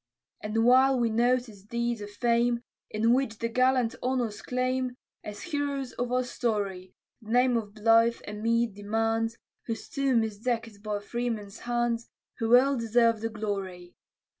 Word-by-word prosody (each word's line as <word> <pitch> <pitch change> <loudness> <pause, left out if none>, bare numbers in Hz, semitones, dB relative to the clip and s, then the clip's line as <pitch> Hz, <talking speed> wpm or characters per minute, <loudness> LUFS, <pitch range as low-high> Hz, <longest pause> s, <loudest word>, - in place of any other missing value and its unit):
And 220 +2 0
while 260 +1 +5
we 235 -2 +1
notice 240 -2 +1
deeds 235 +2 -2
of 205 - -6
fame, 235 +2 +1 0.3
In 225 +2 +2
which 255 -4 0
the 230 - -1
gallant 255 0 +2
honors 245 -4 -1
claim; 255 0 -1 0.3
As 210 0 -7
heroes 285 -6 -2
of 245 0 -3
our 255 0 +2
story, 200 -7 -3 0.3
The 215 - -13
name 250 +1 +4
of 210 -3 -3
Blyth 230 +2 +3
a 205 - -5
meed 230 +1 +1
demands, 225 +2 -1 0.3
Whose 225 -1 -4
tomb 270 -5 +1
is 215 -2 -5
deck'd 225 -3 -3
by 210 -1 -3
freemen's 220 -2 -4
hands, 240 -1 -1 0.3
Who 225 - -1
well 260 +4 +6
deserve 230 -1 +2
the 225 - -1
glory. 195 -5 -5
230 Hz, 155 wpm, -28 LUFS, 215-245 Hz, 0.3 s, well